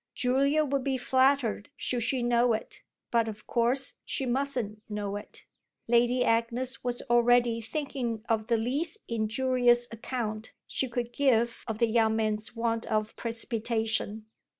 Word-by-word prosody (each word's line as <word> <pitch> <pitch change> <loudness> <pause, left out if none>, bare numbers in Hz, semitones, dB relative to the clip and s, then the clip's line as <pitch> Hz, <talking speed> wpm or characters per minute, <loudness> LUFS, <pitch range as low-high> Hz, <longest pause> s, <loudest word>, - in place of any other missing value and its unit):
Julia 280 +4 +2
would 275 -1 -1
be 270 -1 0
flattered 260 -4 +2
should 245 -1 -1
she 245 +2 0
know 240 0 +3
it, 220 - -5 0.3
but 230 -1 +2
of 215 -1 -7
course 250 +3 +1
she 270 - -2
mustn't 245 -5 -1
know 205 -1 -3
it. 205 - -8 0.4
Lady 240 +2 +3
Agnes 235 +3 0
was 245 0 -1
already 240 -1 +3
thinking 235 -3 -3
of 220 -1 0
the 235 - +2
least 285 - -1
injurious 240 +2 +2
account 220 -2 -4
she 265 - -1
could 240 0 -3
give 235 -4 +2
of 220 - -3
the 235 - +3
young 220 -1 +2
man's 215 0 -1
want 230 0 -1
of 215 0 -1
precipitation. 225 -2 -1
235 Hz, 145 wpm, -28 LUFS, 220-255 Hz, 0.4 s, know